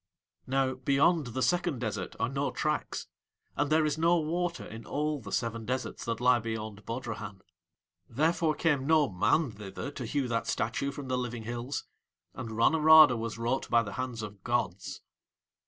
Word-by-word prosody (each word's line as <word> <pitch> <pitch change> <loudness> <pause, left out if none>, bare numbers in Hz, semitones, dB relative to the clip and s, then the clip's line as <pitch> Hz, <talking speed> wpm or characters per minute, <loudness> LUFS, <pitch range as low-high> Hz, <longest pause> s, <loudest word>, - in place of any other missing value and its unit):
Now, 135 0 +1
beyond 140 +4 +2
the 125 +2 -2
second 175 -5 +1
desert 115 -3 -4
are - - +1
no - - -1
tracks, - - -2 0.5
and 145 0 0
there 155 0 +4
is 150 +1 -1
no 170 +2 +4
water 170 +2 -2
in 115 +1 -9
all 150 +3 -1
the 105 -5 -9
seven 115 -1 -1
deserts 130 +3 -3
that 115 -1 -2
lie 125 0 +4
beyond 110 -2 -5
Bodrahan. 115 -5 -5 0.7
Therefore 155 +4 +1
came 145 -5 +1
no 155 -3 +4
man 120 - +2
thither 105 +6 -7
to 130 -3 -6
hew 140 +1 -1
that 115 -1 -1
statue 140 +5 -1
from 140 0 -7
the 130 0 0
living 120 -2 -4
hills, 120 +4 -4 0.5
and 125 -3 -6
Ranorada 155 +4 +7
was 115 -1 -4
wrought 120 +3 -1
by 115 -1 +4
the 100 -3 -7
hands 125 -1 -4
of 100 -2 -9
gods. 100 -6 -2
125 Hz, 170 wpm, -30 LUFS, 115-150 Hz, 0.7 s, Ranorada